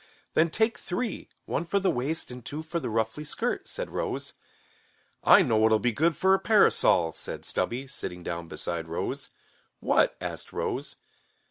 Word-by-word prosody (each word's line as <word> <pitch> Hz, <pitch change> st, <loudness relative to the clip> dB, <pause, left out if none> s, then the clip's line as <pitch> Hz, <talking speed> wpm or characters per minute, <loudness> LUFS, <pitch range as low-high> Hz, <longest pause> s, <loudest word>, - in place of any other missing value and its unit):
"Then 165 Hz, +1 st, +4 dB
take 220 Hz, +7 st, +1 dB
three, 225 Hz, +5 st, -3 dB, 0.2 s
one 155 Hz, -, -1 dB
for 200 Hz, +4 st, 0 dB
the 190 Hz, -1 st, +2 dB
waist 140 Hz, +3 st, -1 dB
and 125 Hz, -1 st, -9 dB
two 150 Hz, +6 st, -5 dB
for 170 Hz, +2 st, -3 dB
the -, -, -4 dB
ruffly 110 Hz, +6 st, -1 dB
skirt," 225 Hz, +11 st, -2 dB
said -, -, -5 dB
Rose. -, -, -3 dB, 0.9 s
"I 190 Hz, -, +8 dB
know 115 Hz, -8 st, +2 dB
what'll 110 Hz, 0 st, +5 dB
be 120 Hz, +3 st, +1 dB
good 155 Hz, +6 st, +1 dB
for 190 Hz, 0 st, +4 dB
a 195 Hz, -, +4 dB
parasol," 200 Hz, -, +4 dB
said -, -, -5 dB
Stubby, 125 Hz, +3 st, -1 dB
sitting 90 Hz, -9 st, -6 dB
down 85 Hz, -1 st, -4 dB
beside 80 Hz, 0 st, -3 dB
Rose. 80 Hz, -, -4 dB, 0.5 s
"What?" -, -, +3 dB
asked -, -, -6 dB
Rose. -, -, -3 dB
145 Hz, 165 wpm, -28 LUFS, 110-185 Hz, 0.9 s, I